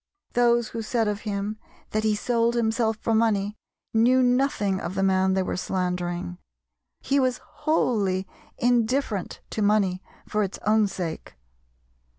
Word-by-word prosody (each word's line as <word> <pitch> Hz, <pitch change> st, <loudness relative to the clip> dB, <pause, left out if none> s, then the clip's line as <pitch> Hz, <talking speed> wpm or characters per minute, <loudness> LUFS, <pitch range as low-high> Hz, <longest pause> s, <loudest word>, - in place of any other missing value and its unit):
Those 240 Hz, -1 st, +3 dB
who 230 Hz, -, -4 dB
said 225 Hz, 0 st, 0 dB
of 210 Hz, 0 st, -2 dB
him 205 Hz, +2 st, -3 dB, 0.3 s
that 215 Hz, 0 st, 0 dB
he 215 Hz, -1 st, +2 dB
sold 235 Hz, +1 st, +1 dB
himself 225 Hz, -1 st, +1 dB
for 225 Hz, -, -1 dB
money 210 Hz, -2 st, +2 dB, 0.4 s
knew 245 Hz, +3 st, +4 dB
nothing 245 Hz, -6 st, +1 dB
of 180 Hz, -, -4 dB
the 195 Hz, -, +1 dB
man 190 Hz, 0 st, +3 dB
they 190 Hz, -, +2 dB
were -, -, -2 dB
slandering. 180 Hz, -, -2 dB, 0.6 s
He 280 Hz, +1 st, +1 dB
was 255 Hz, -2 st, +1 dB
wholly 200 Hz, -, 0 dB, 0.3 s
indifferent 240 Hz, -3 st, 0 dB
to 215 Hz, -, -2 dB
money 200 Hz, -3 st, +2 dB, 0.3 s
for 210 Hz, -, 0 dB
its 195 Hz, -2 st, -2 dB
own 215 Hz, 0 st, +4 dB
sake. 175 Hz, -, -5 dB
215 Hz, 145 wpm, -25 LUFS, 190-235 Hz, 0.6 s, knew